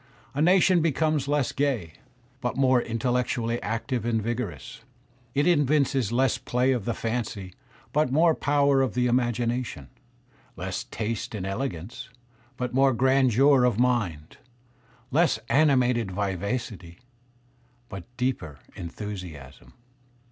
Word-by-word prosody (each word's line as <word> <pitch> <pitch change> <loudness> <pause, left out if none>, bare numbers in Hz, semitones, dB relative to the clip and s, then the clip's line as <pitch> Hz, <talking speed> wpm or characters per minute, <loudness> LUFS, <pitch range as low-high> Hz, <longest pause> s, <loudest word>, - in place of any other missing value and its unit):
A 145 - -1
nation 180 +1 +5
becomes 155 -2 +1
less 145 -2 +1
gay, 125 - -1 0.5
but 125 -1 -3
more 130 -2 +4
intellectually 120 0 -1
active 115 +4 -2
and 115 -1 0
vigorous. 115 0 -5 0.5
It 145 - +2
evinces 145 - +2
less 130 +1 +2
play 125 +2 +1
of 120 -6 -1
the 115 - -1
fancy, 110 -5 -4 0.4
but 150 -3 +2
more 160 +4 +4
power 140 -2 +2
of 130 - -1
the 125 0 +2
imagination; 120 - -1 0.7
less - - -4
taste 110 0 -4
and 95 -3 -4
elegance, 100 0 -5 0.5
but 125 -1 -3
more 135 +1 +4
grandeur 130 +1 +4
of 125 -4 +2
mind; 105 -12 0 0.7
less 165 +5 +3
animated 125 -7 +3
vivacity, 95 -1 -4 0.9
but 95 -5 -8
deeper 120 - -2 0.2
enthusiasm. 85 - -8
125 Hz, 115 wpm, -26 LUFS, 105-135 Hz, 0.9 s, nation